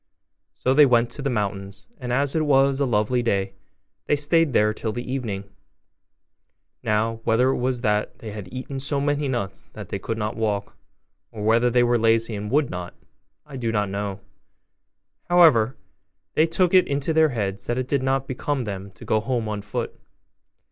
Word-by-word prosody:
So 130 - +1
they 145 +1 +7
went 120 -1 +3
to 145 - -6
the 140 - -1
mountains; 100 -3 -3
and 125 -1 -4
as 140 +3 +1
it 160 - +2
was 135 -2 +3
a 140 - +2
lovely 115 +2 +1
day, 100 -4 0 0.5
they - - +3
stayed 150 +2 +2
there 105 -3 +3
till 110 0 -3
the 120 +3 -5
evening. 110 -7 -3 1.4
Now, 110 +1 0
whether 120 +4 +3
it 135 - +1
was 125 -1 -1
that 105 -1 0
they 110 - -8
had 100 -3 -8
eaten 130 +1 -5
so 140 +1 -1
many 145 0 0
nuts 100 -7 -4
that - - -9
they - - -3
could 115 - -4
not 105 0 -2
walk, 105 -3 -2 0.6
or 105 -2 -6
whether 115 +3 +3
they 120 0 +3
were 120 0 +2
lazy 115 0 +2
and 105 0 -4
would 145 +2 +1
not, 90 -1 -6 0.5
I 140 -3 -9
do 115 -3 -1
not 105 -3 0
know: 100 0 -4 1.1
however, 145 -10 +5 0.6
they 160 - +3
took 175 +2 +1
it 185 -1 +6
into 140 +3 -1
their 160 0 +4
heads 100 -6 -2
that 120 - -1
it 130 -1 -2
did 140 -1 +1
not 135 0 0
become 135 +1 -2
them 100 -2 -5
to - - -13
go 110 - +2
home 115 0 -2
on 105 -1 -3
foot. 105 - -4
120 Hz, 190 wpm, -24 LUFS, 105-135 Hz, 1.4 s, they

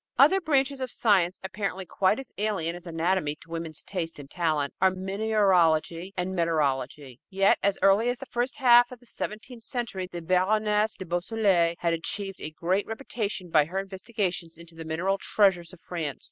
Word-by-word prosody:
Other 305 +9 +6
branches 275 -4 +1
of 260 - -2
science, 190 -6 +2
apparently 190 -1 -4
quite 190 +3 +1
as 270 -2 -8
alien 195 -6 -1
as 175 0 -11
anatomy 165 -2 0
to 165 +2 -18
women's 165 -2 -4
taste 170 -4 -4
and 145 -2 -10
talent, 155 -3 -1
are 190 - +6
mineralogy 185 -3 +1
and 180 +1 -2
metallurgy. 140 -5 -1
Yet 195 0 +3
as 200 -1 +2
early 200 +5 +5
as 245 - -1
the 270 - -8
first 245 0 -2
half 245 -1 +6
of 250 - -10
the 245 - -22
seventeenth 230 +2 -7
century, 225 -8 -4
the 175 -1 -6
Baroness 210 +4 +1
de 190 - -7
Beausoleil 175 -1 +1
had 170 -1 +1
achieved 195 +4 -4
a - - -3
great 180 +5 -1
reputation 215 -6 -4
by 150 -2 +5
her 180 +5 -6
investigations 190 -3 -3
into 170 0 -13
the 165 0 -9
mineral 180 +5 -1
treasures 190 -6 +2
of 185 - -14
France. 160 -6 -4
190 Hz, 175 wpm, -27 LUFS, 165-215 Hz, -, Other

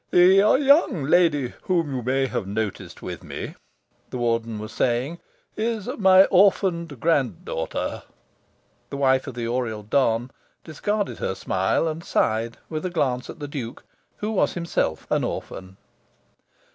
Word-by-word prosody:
"The 180 +1 +6 0.3
young 280 - +4
lady 150 -4 +3
whom 170 -6 0
you 125 - -2
may 130 +3 +1
have 110 -6 -3
noticed 105 0 -4
with - - -6
me," - - -6 0.6
the - - -5
Warden 115 -2 -1
was 110 +1 -7
saying, 130 +7 -1 0.4
"is 220 -2 -2
my 190 -1 +7
orphaned 180 - +2
grand 135 - +1
daughter." - - -3 0.9
(The 140 - -5
wife 130 -1 +2
of 135 - -6
the 120 -1 -3
Oriel 115 -3 -2
don 120 +1 +1 0.3
discarded 205 +6 -2
her 95 - -2
smile, 95 - 0
and 160 +1 -4
sighed, 115 -3 0
with 155 -1 -4
a 185 - -1
glance 135 -7 -1
at - - -8
the 145 -2 -6
Duke, 130 -5 -6 0.3
who 210 +1 -3
was 215 - +1
himself 170 - -2
an - - +2
orphan.) 95 0 -6
135 Hz, 145 wpm, -24 LUFS, 115-175 Hz, 0.9 s, my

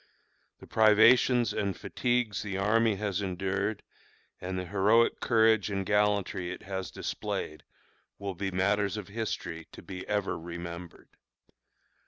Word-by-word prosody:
The - - -14
privations 115 +3 +5
and 100 -3 -2
fatigues 120 -3 -1
the 100 -2 -4
army 110 +2 +2
has 100 -1 -2
endured, 100 +2 -2 0.6
and 95 +1 -4
the 90 - -3
heroic 105 +5 +3
courage 110 -3 +3
and 95 -1 -2
gallantry 105 -3 +1
it 90 - -8
has 95 0 -4
displayed, 75 - -4 0.5
will 100 -1 -4
be 95 +2 -3
matters 100 +2 +1
of 105 -2 -7
history 95 -6 -4
to - - -11
be 95 -1 -8
ever 100 -4 -1
remembered. 85 0 -8
100 Hz, 130 wpm, -29 LUFS, 95-110 Hz, 0.6 s, privations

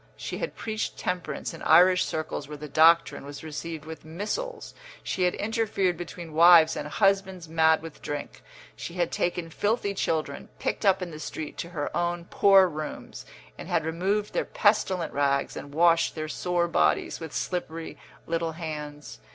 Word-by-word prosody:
She - - -5
had - - -4
preached 220 -1 -4
temperance 180 -1 -3
in - - -10
Irish 180 +1 +6
circles 155 -2 -4
where 150 0 -8
the 150 +1 -7
doctrine 165 +3 +4
was 145 +2 -9
received 160 0 -6
with 160 0 -9
missiles; 215 - -5 0.3
she 185 - 0
had 180 - +1
interfered 205 -4 0
between 170 -1 -8
wives 165 0 +7
and - - -4
husbands 190 0 +1
mad 160 0 +3
with 165 -2 -10
drink; 145 -1 -6 0.3
she 170 - -7
had 175 -2 0
taken 175 -2 -2
filthy 205 +1 0
children, 155 -6 -2
picked 210 - -2
up 190 -1 +4
in 175 - -6
the 155 - -8
street, 155 0 -6
to 170 - -4
her 150 -5 -4
own 175 0 -1
poor 195 0 +5
rooms, 155 -2 -7 0.3
and - - -7
had 160 - +1
removed 195 +6 -1
their - - +1
pestilent 195 -5 +1
rags 140 -1 +1
and 145 - -8
washed 165 +2 +3
their 155 -1 -4
sore 175 +2 0
bodies 80 - +1
with 160 -2 -7
slippery 165 -2 -4 0.3
little 165 0 -2
hands. 150 - -7
170 Hz, 165 wpm, -27 LUFS, 155-185 Hz, 0.3 s, wives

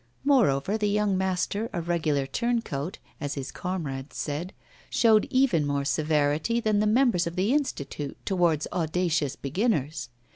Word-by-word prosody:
Moreover, 215 - +3
the 210 -1 +1
young 205 -1 +1
master, 190 +4 -1
a 175 - -1
regular 160 -5 0
turncoat, 195 - -2 0.2
as 145 -3 -3
his 135 -2 -5
comrades 150 -7 -4
said, 155 +5 -3 0.4
showed 220 -3 +4
even 255 - +3
more 140 -1 -1
severity 155 +8 +1
than 215 -3 +1
the 210 - +2
members 220 -6 +3
of 170 - -5
the 195 +7 +1
Institute 145 - -2
towards 175 -6 +2
audacious 165 -4 0
beginners. 155 - -1
175 Hz, 140 wpm, -27 LUFS, 145-210 Hz, 0.4 s, showed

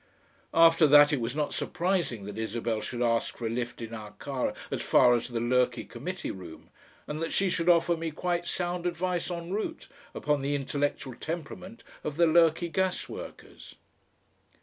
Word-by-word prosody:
After 165 -1 +7
that 145 +1 +7
it 135 - 0
was 115 +3 -3
not 150 -1 -1
surprising 175 - -1
that 105 +1 -6
Isabel 110 0 -2
should 120 +1 -3
ask 115 -1 0
for 120 - -5
a 110 - -1
lift 120 0 -4
in 115 0 -7
our 105 -2 -8
car 135 -3 -2 0.2
as - - -2
far 125 -1 +5
as 120 - 0
the 120 -2 -3
Lurky 125 0 +1
Committee 175 +10 -5
Room, 90 -4 -11 0.3
and 150 +1 -5
that 165 - -2
she 195 -2 +2
should 165 +1 +1
offer 170 0 +4
me 165 0 -3
quite 175 +2 -2
sound 175 0 -2
advice 175 0 -2
EN 170 +1 -5
ROUTE 270 +11 -3 0.3
upon 150 -1 0
the 140 +1 0
intellectual 140 -1 -2
temperament 175 - -7 0.2
of 150 0 -4
the 170 - +5
Lurky 165 +1 +4
gasworkers. 190 0 -4
150 Hz, 170 wpm, -28 LUFS, 120-175 Hz, 0.3 s, After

